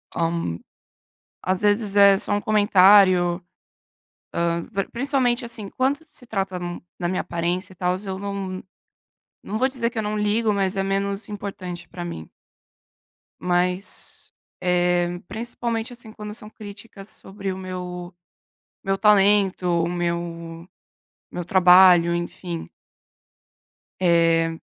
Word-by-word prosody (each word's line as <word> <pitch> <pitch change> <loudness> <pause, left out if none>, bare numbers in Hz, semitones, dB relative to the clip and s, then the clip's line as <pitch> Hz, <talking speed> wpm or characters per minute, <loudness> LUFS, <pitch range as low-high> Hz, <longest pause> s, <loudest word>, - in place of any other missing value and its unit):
Hã, 165 - -1 0.9
às 185 +1 -1
vezes 205 0 +1
é 200 -1 +7
só 205 - -1
um 205 - 0
comentário, 190 -4 +5 1.0
hã, 170 0 0
pr 195 -3 -3
principalmente 255 -1 0
assim 225 -3 -3
quando 265 +5 0
se 250 - -14
trata 195 -4 -2
n 175 0 -5 0.2
na 175 - -1
minha 180 +1 -1
aparência 175 +2 -2
e - - -21
tals, 180 +3 -1
eu 190 -1 -4
não 195 -2 -4 0.8
não 210 - -3
vou 255 +3 +3
dizer 250 -3 -2
que 235 - -11
eu 220 - 0
não 210 0 -2
ligo, 210 +1 +1
mas 195 -1 0
é 195 - +1
menos 195 +1 -2
importante 195 -4 -7
pra 175 -1 -6
mim. 80 - -7 1.1
Mas, 180 +2 -2 0.3
eh, 175 -1 +1
principalmente, 230 +1 -4
assim, 235 -2 -10
quando 210 -1 -8
são 210 -1 -10
críticas 205 -1 -11
sobre 195 -2 -6
o 185 - -7
meu 180 -1 -6 0.7
meu 195 -2 0
talento, 200 -2 +4 0.2
o 170 - 0
meu 170 -1 -4 0.6
meu 175 - -5
trabalho, 180 -1 +6
enfim. 170 0 -5 1.3
Eh 165 -2 +3
190 Hz, 130 wpm, -23 LUFS, 175-210 Hz, 1.3 s, é